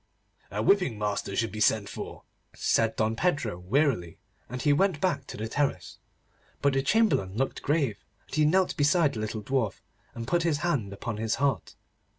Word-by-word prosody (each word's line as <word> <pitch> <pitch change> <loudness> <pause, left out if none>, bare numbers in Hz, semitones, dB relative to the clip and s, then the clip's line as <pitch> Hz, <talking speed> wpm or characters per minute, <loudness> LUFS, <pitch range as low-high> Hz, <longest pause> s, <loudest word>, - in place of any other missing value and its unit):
'A - - -2
whipping 180 - +3
master 105 -1 -2
should 115 -2 0
be 110 - -6
sent 110 -1 +3
for,' - - -7 0.3
said 115 -1 +1
Don 110 0 0
Pedro 120 - 0
wearily, 95 - 0 0.3
and 125 +2 -5
he 145 +2 +3
went 180 0 +2
back 145 -6 0
to - - -7
the 110 +2 -3
terrace. 110 - -2 0.6
But 140 -1 +2
the 135 - +2
Chamberlain 140 - +2
looked 135 +2 -1
grave, 140 -9 0 0.2
and - - -18
he 155 - +3
knelt 185 +4 +3
beside 145 +1 +3
the 110 - -5
little 110 0 -4
dwarf, 125 -3 -1 0.3
and 115 -1 -5
put 170 +5 +2
his 165 -3 +1
hand 125 - 0
upon 105 +2 -5
his 110 0 0
heart. 140 -1 -1
130 Hz, 180 wpm, -28 LUFS, 110-150 Hz, 0.6 s, whipping